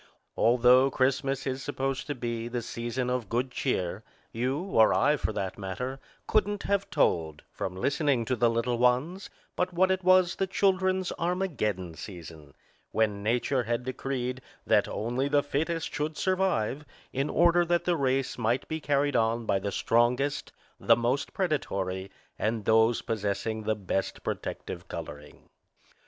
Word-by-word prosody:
Although 125 Hz, +3 st, +5 dB
Christmas 135 Hz, +1 st, 0 dB
is 130 Hz, 0 st, -2 dB
supposed 135 Hz, -1 st, -3 dB
to 145 Hz, -, -2 dB
be 115 Hz, -2 st, -3 dB
the 120 Hz, 0 st, -3 dB
season 120 Hz, +2 st, -3 dB
of 125 Hz, -5 st, -2 dB
good 125 Hz, +2 st, -1 dB
cheer, 100 Hz, -7 st, -2 dB, 0.3 s
you 125 Hz, +4 st, -1 dB
(or 115 Hz, -, +4 dB
I, 145 Hz, +3 st, +4 dB
for 135 Hz, -, -2 dB
that 100 Hz, -2 st, -4 dB
matter) 125 Hz, +8 st, -4 dB, 0.3 s
couldn't 205 Hz, -1 st, +1 dB
have 200 Hz, 0 st, 0 dB
told, 80 Hz, -3 st, +1 dB
from 90 Hz, -1 st, -4 dB
listening 140 Hz, -, +1 dB
to 130 Hz, +2 st, 0 dB
the 120 Hz, 0 st, +3 dB
little 115 Hz, +1 st, 0 dB
ones, 130 Hz, +10 st, +1 dB, 0.3 s
but 180 Hz, 0 st, -1 dB
what 190 Hz, +2 st, +3 dB
it 190 Hz, 0 st, 0 dB
was 185 Hz, -1 st, +4 dB
the 195 Hz, -, 0 dB
children's 190 Hz, -1 st, +1 dB
Armageddon 140 Hz, -, -1 dB
season, 80 Hz, -4 st, -10 dB, 0.3 s
when 105 Hz, -2 st, 0 dB
Nature 125 Hz, +5 st, +1 dB
had 120 Hz, +2 st, -1 dB
decreed 130 Hz, -1 st, -3 dB, 0.2 s
that -, -, +3 dB
only 120 Hz, +5 st, -1 dB
the 145 Hz, 0 st, +2 dB
fittest 160 Hz, +3 st, -2 dB
should 150 Hz, +1 st, -2 dB
survive, 180 Hz, -, 0 dB, 0.3 s
in 135 Hz, +3 st, -1 dB
order 175 Hz, +1 st, +4 dB
that 175 Hz, 0 st, +1 dB
the 175 Hz, -, +1 dB
race 135 Hz, -3 st, 0 dB
might 120 Hz, +2 st, 0 dB
be 160 Hz, 0 st, -4 dB
carried 145 Hz, -1 st, +1 dB
on 115 Hz, 0 st, +1 dB
by 100 Hz, -, +1 dB
the 100 Hz, +1 st, -3 dB
strongest, 125 Hz, +7 st, +1 dB, 0.3 s
the -, -, +5 dB
most 125 Hz, +4 st, 0 dB
predatory 100 Hz, -, -2 dB, 0.3 s
and 110 Hz, -1 st, -1 dB
those 110 Hz, +1 st, +4 dB
posessing 110 Hz, 0 st, -2 dB
the 110 Hz, 0 st, +1 dB
best 95 Hz, -1 st, -3 dB
protective -, -, -5 dB
coloring. 75 Hz, 0 st, -9 dB
125 Hz, 150 wpm, -28 LUFS, 110-150 Hz, 0.3 s, Although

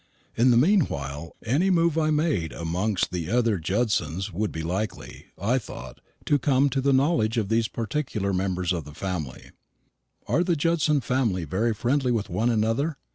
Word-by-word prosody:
In 120 Hz, +3 st, +4 dB
the 120 Hz, -, +5 dB
meanwhile 85 Hz, -, +1 dB
any 145 Hz, -, +2 dB
move 170 Hz, -3 st, +3 dB
I 155 Hz, -1 st, +2 dB
made 150 Hz, -, 0 dB
amongst 90 Hz, +4 st, -1 dB
the 85 Hz, -3 st, -3 dB
other 115 Hz, -4 st, +2 dB
Judsons 95 Hz, -1 st, -1 dB
would 105 Hz, +4 st, -1 dB
be 80 Hz, -, -5 dB
likely, 95 Hz, +6 st, -4 dB
I 120 Hz, +6 st, +1 dB
thought, 65 Hz, -, -10 dB, 0.2 s
to 145 Hz, -, +2 dB
come 135 Hz, +1 st, +2 dB
to 135 Hz, -, 0 dB
the 140 Hz, +1 st, +2 dB
knowledge 130 Hz, -5 st, +2 dB
of 105 Hz, -4 st, 0 dB
these 115 Hz, 0 st, +2 dB
particular 110 Hz, -4 st, -2 dB
members 90 Hz, -1 st, 0 dB
of 85 Hz, -3 st, -3 dB
the 75 Hz, +1 st, -12 dB
family. 85 Hz, -9 st, -5 dB, 0.7 s
"Are 170 Hz, -, +2 dB
the 175 Hz, -1 st, +1 dB
Judson 155 Hz, -2 st, +2 dB
family 115 Hz, -8 st, 0 dB
very 110 Hz, +9 st, 0 dB
friendly 125 Hz, +3 st, +1 dB
with 110 Hz, -3 st, -1 dB
one 115 Hz, +2 st, +1 dB
another?" 115 Hz, +7 st, 0 dB
115 Hz, 170 wpm, -25 LUFS, 90-140 Hz, 0.7 s, the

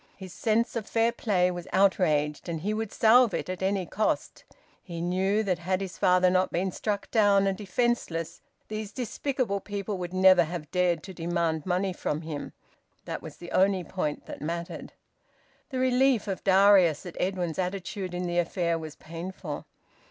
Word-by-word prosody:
His 190 Hz, -2 st, -10 dB
sense 230 Hz, +2 st, 0 dB
of 225 Hz, -3 st, -3 dB
fair 230 Hz, 0 st, +2 dB
play 185 Hz, -6 st, +1 dB
was 175 Hz, -1 st, -6 dB
outraged, 160 Hz, -6 st, +2 dB
and 165 Hz, -2 st, -3 dB
he 210 Hz, +5 st, -1 dB
would 220 Hz, -1 st, -3 dB
salve 230 Hz, 0 st, +5 dB
it -, -, -4 dB
at 185 Hz, -, -6 dB
any 190 Hz, -1 st, 0 dB
cost. 215 Hz, +5 st, -2 dB, 0.4 s
He 170 Hz, -2 st, -7 dB
knew 190 Hz, +5 st, +1 dB
that 185 Hz, -4 st, 0 dB
had 185 Hz, +2 st, -1 dB
his 190 Hz, -2 st, -6 dB
father 180 Hz, 0 st, +4 dB
not 185 Hz, 0 st, +2 dB
been 185 Hz, +2 st, -1 dB
struck 205 Hz, +2 st, -3 dB
down 205 Hz, -3 st, +4 dB
and 195 Hz, -1 st, +1 dB
defenceless, 190 Hz, -6 st, -1 dB, 0.3 s
these 215 Hz, -1 st, -5 dB
despicable 250 Hz, -2 st, -2 dB
people 200 Hz, 0 st, -4 dB
would 175 Hz, -1 st, -4 dB
never 185 Hz, -1 st, +6 dB
have 155 Hz, -2 st, -6 dB
dared 180 Hz, -3 st, +1 dB
to 190 Hz, -, -8 dB
demand 170 Hz, -1 st, -1 dB
money 185 Hz, +1 st, 0 dB
from 155 Hz, -3 st, -3 dB
him. 155 Hz, -3 st, -6 dB, 0.5 s
That -, -, -5 dB
was -, -, -10 dB
the 175 Hz, -, -10 dB
only 190 Hz, -1 st, +3 dB
point 155 Hz, -3 st, -3 dB
that -, -, -9 dB
mattered. 170 Hz, +2 st, -5 dB, 0.8 s
The 265 Hz, -, -4 dB
relief 255 Hz, -2 st, +3 dB
of 195 Hz, -2 st, -3 dB
Darius 190 Hz, -5 st, +5 dB
at 175 Hz, -, -8 dB
Edwin's 180 Hz, -3 st, -1 dB
attitude 185 Hz, 0 st, -3 dB
in 180 Hz, 0 st, -2 dB
the 175 Hz, 0 st, 0 dB
affair 170 Hz, -1 st, 0 dB
was 155 Hz, -2 st, -8 dB
painful. 165 Hz, -1 st, -7 dB
185 Hz, 175 wpm, -27 LUFS, 175-205 Hz, 0.8 s, never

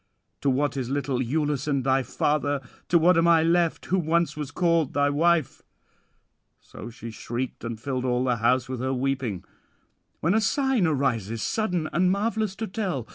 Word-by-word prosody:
To 140 Hz, -, +2 dB
what 145 Hz, +2 st, 0 dB
is 125 Hz, -2 st, -3 dB
little 140 Hz, -2 st, -1 dB
Iülus 145 Hz, +2 st, -1 dB
and 140 Hz, -3 st, 0 dB
thy 135 Hz, +1 st, +2 dB
father, 145 Hz, +1 st, 0 dB, 0.3 s
to 170 Hz, -, +5 dB
what 170 Hz, +1 st, +4 dB
am 165 Hz, -, +3 dB
I 165 Hz, -1 st, +5 dB
left 170 Hz, 0 st, +1 dB
who 190 Hz, -, +1 dB
once 165 Hz, -2 st, +1 dB
was 150 Hz, -3 st, -5 dB
called 165 Hz, -2 st, +1 dB
thy 145 Hz, 0 st, +3 dB
wife?" 160 Hz, -1 st, +1 dB, 1.0 s
'So 115 Hz, -, -10 dB
she 115 Hz, 0 st, -9 dB
shrieked, 120 Hz, +3 st, -5 dB
and 115 Hz, -2 st, -5 dB
filled 130 Hz, 0 st, -3 dB
all 125 Hz, -1 st, +1 dB
the 125 Hz, -2 st, +1 dB
house 125 Hz, +2 st, +2 dB
with 130 Hz, -1 st, -5 dB
her 130 Hz, +1 st, -1 dB
weeping; 130 Hz, -8 st, -2 dB, 0.8 s
when 165 Hz, +4 st, +1 dB
a 220 Hz, -, +3 dB
sign 250 Hz, -, +1 dB
arises 115 Hz, -7 st, -1 dB
sudden 180 Hz, -8 st, -1 dB
and 180 Hz, +4 st, +3 dB
marvellous 215 Hz, 0 st, -1 dB
to 225 Hz, -, -4 dB
tell. 185 Hz, -, -3 dB
145 Hz, 180 wpm, -25 LUFS, 130-170 Hz, 1.0 s, to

